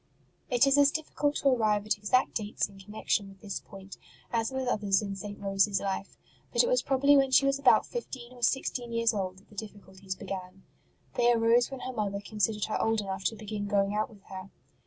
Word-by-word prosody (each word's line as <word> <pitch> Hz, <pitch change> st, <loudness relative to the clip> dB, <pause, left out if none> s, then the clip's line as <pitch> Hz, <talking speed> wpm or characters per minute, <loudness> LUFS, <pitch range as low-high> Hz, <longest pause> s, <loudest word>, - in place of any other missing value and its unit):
It 245 Hz, 0 st, +4 dB
is 275 Hz, +1 st, +4 dB
as 285 Hz, -1 st, +6 dB
difficult 295 Hz, -1 st, -1 dB
to 275 Hz, -, +2 dB
arrive 215 Hz, -5 st, +2 dB
at 215 Hz, -, +1 dB
exact 210 Hz, +5 st, +2 dB
dates 215 Hz, -1 st, -1 dB
in 200 Hz, -1 st, -16 dB
con 210 Hz, +2 st, -12 dB
nection 200 Hz, -2 st, 0 dB
with 195 Hz, -1 st, -16 dB
this 200 Hz, -2 st, -4 dB
point 195 Hz, -1 st, -12 dB, 0.4 s
as 225 Hz, -1 st, +1 dB
with 265 Hz, -1 st, -3 dB
others 205 Hz, -5 st, +2 dB
in 200 Hz, -1 st, -4 dB
St. 205 Hz, +1 st, -7 dB
Rose 195 Hz, 0 st, +2 dB
s 200 Hz, -2 st, 0 dB
life; 195 Hz, 0 st, -4 dB, 0.3 s
but -, -, +4 dB
it -, -, +1 dB
was -, -, +3 dB
probably 280 Hz, +1 st, +4 dB
when 270 Hz, -1 st, +4 dB
she 260 Hz, +1 st, +5 dB
was 275 Hz, 0 st, +1 dB
about 275 Hz, -, +5 dB
fifteen 255 Hz, -, -7 dB
or 245 Hz, -, -14 dB
sixteen 240 Hz, -1 st, 0 dB
years 230 Hz, 0 st, +2 dB
old 185 Hz, -3 st, -3 dB
that 190 Hz, -, -21 dB
the 210 Hz, -, -17 dB
difficulties 195 Hz, -2 st, -7 dB
began. 185 Hz, 0 st, -7 dB, 0.5 s
They 240 Hz, 0 st, +3 dB
arose 235 Hz, +1 st, +3 dB
when 270 Hz, -2 st, -7 dB
her 255 Hz, -, -5 dB
mother 200 Hz, -3 st, -2 dB
considered 210 Hz, +1 st, -1 dB
her 215 Hz, -, -2 dB
old 225 Hz, -1 st, +1 dB
enough 190 Hz, -1 st, -5 dB
to 225 Hz, -, +1 dB
begin 210 Hz, -1 st, -5 dB
going 200 Hz, 0 st, +1 dB
out 215 Hz, +1 st, 0 dB
with 205 Hz, -3 st, -17 dB
her. 190 Hz, 0 st, -9 dB
215 Hz, 220 wpm, -29 LUFS, 195-245 Hz, 0.5 s, as